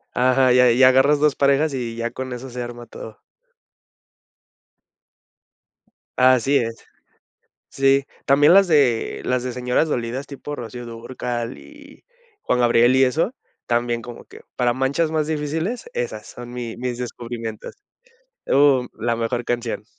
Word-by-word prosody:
Ajá, 130 0 +3
y 125 - +4
a 125 -1 +6
y 125 +3 +3
agarras 135 +3 +5
2 150 -2 +2
parejas, 140 +2 +2
y 120 -3 -4
ya 115 0 -3
con 130 -1 -6
eso 125 +2 -7
se 125 +1 -5
arma 120 0 -7
todo. 110 -1 -11 3.0
Así 130 +2 +4
es. 115 -2 -4 0.9
Sí, 135 0 +2 0.2
también 145 +3 +5
las 195 +1 +6
de 140 -8 +2
las 125 -1 0
de 125 - -3
señoras 125 +5 0
dolidas, 125 0 -3
tipo 145 +1 -7
Rocío 120 0 -7
Dúrcal 120 +1 -5
y 290 -1 -16 0.4
Juan - - 0
Gabriel, 120 +1 +4
y 135 - +5
eso, 160 - 0 0.3
también 120 0 0
como 120 0 -10
que - - -15 0.2
para 120 -1 +2
manchas 140 +5 0
más 155 -1 0
difíciles, 160 - -3
esas 485 0 -4
son 120 0 -10
mi 120 -2 -6
mis 125 0 -4
descubrimientos. 115 -2 -6 0.7
Uh, 140 -2 +4
mm, 125 - -10
la 115 +1 -1
mejor 120 +1 -2
canción. 120 -3 -3
125 Hz, 145 wpm, -21 LUFS, 120-140 Hz, 3.0 s, a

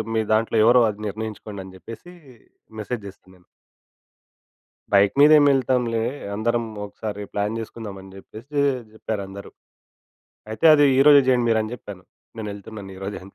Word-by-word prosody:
మీ 110 - +2
దాంట్లో 110 +1 +1
ఎవరో 120 +1 +6
అది 105 0 -7
నిర్ణయించుకోండి, 105 -1 -6
అని 95 - -13
జెప్పేసి 115 - -11 0.7
మెసేజ్ 105 +1 -5
జేసా 95 - -13
నేను. 90 -1 -25 1.5
బైక్ 100 0 +4
మీద 150 +2 +7
ఏం 145 - +4
ఎళ్తాంలే, 125 -3 0 0.3
అందరం 115 +2 0 0.2
ఒకసారి 105 0 -7
ప్లాన్ 105 +2 -2
జేసుకుందాం 110 -2 -8
అని 95 0 -14
జెప్పేసి 115 +9 -10 0.3
జెప్పారందరూ. 100 -2 -6 1.0
అయితే 110 +9 +1
అది 145 - +5
ఈ - - +5
రోజే 145 -1 +8
జేయండి 125 -2 +3
మీరు 110 -1 +2
అని 110 - -6
జెప్పాను. 100 -5 -11 0.3
నేను 110 -2 -5
వెళ్తున్నాను 100 -1 -10
ఈరోజే 95 +1 -6
అని. 100 - -16
110 Hz, 150 wpm, -22 LUFS, 100-120 Hz, 1.5 s, రోజే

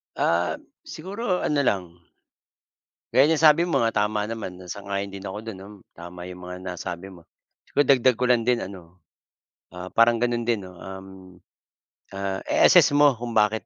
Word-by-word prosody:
Ah, 85 +1 +1 0.3
siguro 190 +3 -3
ano 150 - +1
lang, 100 -6 +1 1.3
gaya 135 +3 +5
ng 160 - +3
sabi 160 +2 +6
mo 135 -7 +1
nga 115 - +1
tama 105 0 -2
naman 105 -5 -6
sang-ayon 100 0 -4
din 100 0 -8
ako 95 +2 -5
do'n 110 -4 -7
no, 95 - -11 0.3
tama 90 +1 -10
'yong 90 0 -9
mga 90 0 -7
nasabi 90 +1 -6
mo, 85 -2 -16 0.4
siguro 145 - +2
dagdag 130 -2 +3
ko 125 - -1
lang 120 -2 +3
din 125 -1 +2
ano. 90 -2 -12 0.8
Ah, 90 +1 -7
parang 115 0 +4
gano'n 120 -1 0
din 115 -5 0
no, 90 0 -12
um, 95 0 -9 1.1
ah, 95 0 -3
i-assess - - +5
mo 145 -1 +5
kung 120 0 -6
bakit, 105 +1 +2
105 Hz, 165 wpm, -24 LUFS, 95-125 Hz, 1.3 s, sabi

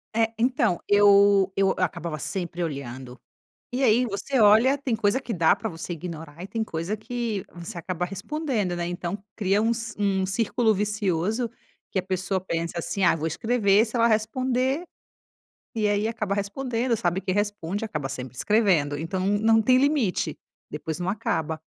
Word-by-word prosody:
É, 225 0 +2
então, 245 - +1
eu 200 -1 +5
eu 195 -1 +3
acabava 170 -3 -2
sempre 175 +1 -3
olhando, 130 -4 -6 0.5
e 250 - -2
aí 240 +1 +4
você 235 +5 -1
olha, 220 +6 +6
tem 265 -5 -2
coisa 210 +4 +1
que 250 - -5
dá 165 -4 +4
pra 220 - -4
você 170 -1 -6
ignorar 165 -1 -7
e 190 - -7
tem 220 +2 -2
coisa 170 +3 -3
que 225 -2 -3
você 175 +2 -7
acaba 175 +1 -3
respondendo, 205 - -2
né. 175 0 -2
Então, 175 +1 -3 0.2
cria 200 0 +2
um 225 +1 +2
ci 230 -1 -4
um 195 -2 +1
círculo 220 +3 +1
vicioso 205 +2 0 0.4
que - - 0
a - - -15
pessoa 190 +1 -1
pensa 170 -2 -3
assim: 195 +3 -1
"Ah, 170 - +5
vou 160 0 -2
escrever 215 +3 +3
se 220 - -9
ela 230 0 +4
responder", 255 +6 0 0.9
e 220 -3 +1
aí 205 +1 +1
acaba 215 -3 -2
respondendo, 230 +4 -1
sabe 175 0 0
que 185 - -2
responde, 205 0 -2
acaba 150 -10 -4
sempre 130 -1 -6
escrevendo. 170 - +2
Então, 185 +5 -3
não 220 +3 +3
tem 255 +4 +4
limite, 255 - +1 0.3
depois 155 +2 -5
não 180 - -3
acaba. 160 -6 -1
200 Hz, 170 wpm, -25 LUFS, 175-225 Hz, 0.9 s, olha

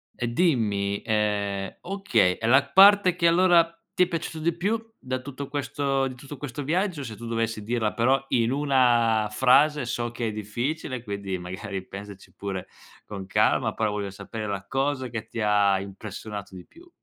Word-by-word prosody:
E 120 - -2
dimmi 110 - +1
ehm, 105 -2 -1
okay, 195 - +1
e 110 - -1
la 130 +3 +6
parte 195 +2 +6
che 170 -2 +3
allora 170 -1 +4 0.2
ti 180 - +4
è - - +1
piaciuto 165 -2 -4
di 165 +1 0
più 200 +6 0 0.2
da 130 0 -4
tutto 140 +1 -7
questo 140 -1 -1
di 130 - -7
tutto 140 +2 -10
questo 145 0 -6
viaggio? 170 0 -1
Se 110 -4 -7
tu 120 - -9
dovessi 115 -2 -2
dirla, 110 -1 -1
però, 130 +3 +2
in 115 0 +2
una 120 -6 +3
frase, 140 +4 +4
so 120 0 -3
che 120 -1 -3
è - - -2
difficile, 120 +5 -4
quindi, 100 -3 -4
magari 95 +2 -6
pensaci 100 0 -10
pure 95 -2 -5 0.4
con 100 -2 -7
calma, - - +2
però 110 -2 0
voglio 100 -1 -3
sapere 100 +2 -7
la 100 -1 -4
cosa 135 -1 -1
che 115 -1 -5
ti 115 - -7
ha 100 -2 +3
impressionato 100 0 -8
di 90 - -10
più. 350 +1 -18
120 Hz, 175 wpm, -25 LUFS, 105-145 Hz, 0.4 s, la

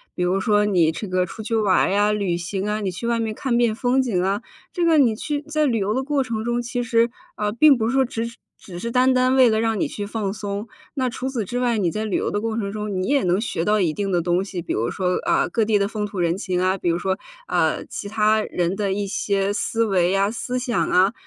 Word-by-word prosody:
比 180 - -1
如 180 +2 +1
说 210 +1 +2
你 180 -6 +3
这 205 +4 -6
个 185 0 +1
出 220 +5 -8
去 230 - -4
玩 205 -4 +3
儿 - - 0
呀， 205 +1 +3
旅 195 -5 -1
行 190 +3 -3
啊、 210 +1 -1
你 200 -3 -2
去 210 +6 -5
外 235 -1 +1
面 220 -1 -2
看 245 -1 -1
遍 235 -2 +2
风 250 +3 +2
景 220 -9 0
啊。 195 +2 0 0.3
这 350 -2 0
个 330 -2 +4
你 250 -6 +4
去 290 +4 -3
在 305 +1 0
旅 235 -5 +1
游 200 +1 0
的 260 - 0
过 280 0 0
程 225 -3 -4
中， 240 0 0
其 245 +1 -3
实， 235 -1 +2 0.3
呃， 210 0 -1
并 275 +5 +5
不 220 -1 0
是 - - -2
说 270 0 +4
只 230 -2 -3
是 235 0 -8 0.2
只 180 -3 -10
是 235 +5 -4
单 255 +2 +4
单 255 +1 +3
为 255 - +7
了 220 -1 +2
让 225 -2 0
你 - - +1
去 205 - -5
放 205 -2 -3
松。 205 0 -5 0.3
那 260 -3 0
除 255 +2 -4
此 240 -6 -3
之 245 +6 -3
外， 240 -2 +1
你 185 -5 +1
在 215 +6 -3
旅 215 -3 -1
游 - - -1
的 205 - -2
过 225 0 -2
程 200 -3 -2
中， 210 -1 -4
你 185 - -2
也 280 0 +2
能 180 +1 +2
学 215 -6 -2
到 210 +3 +2
一 170 -5 +1
定 195 +3 -2
的 175 -2 +2
东 175 +2 +1
西， 190 -3 -5
比 - - -3
如 115 +2 -1
说， 180 -1 0
啊， 345 +1 +2
各 230 - 0
地 210 -1 +2
的 200 - +1
风 210 -1 -3
土 200 -2 -6
人 170 +1 +1
情 185 -3 -2
啊； 185 +1 +1
比 175 - -1
如 170 +1 0
说， 190 +1 -1 0.3
啊， - - +1
其 205 - -6
他 215 0 +2
人 175 -1 -1
的 200 -1 -1
一 200 +1 -2
些 200 0 0
思 225 +2 0
维 185 -4 +2
呀， 195 +1 +2
思 245 +3 -3
想 245 -2 -1
啊、 190 +4 +4
210 Hz, 295 characters per minute, -22 LUFS, 195-235 Hz, 0.3 s, 为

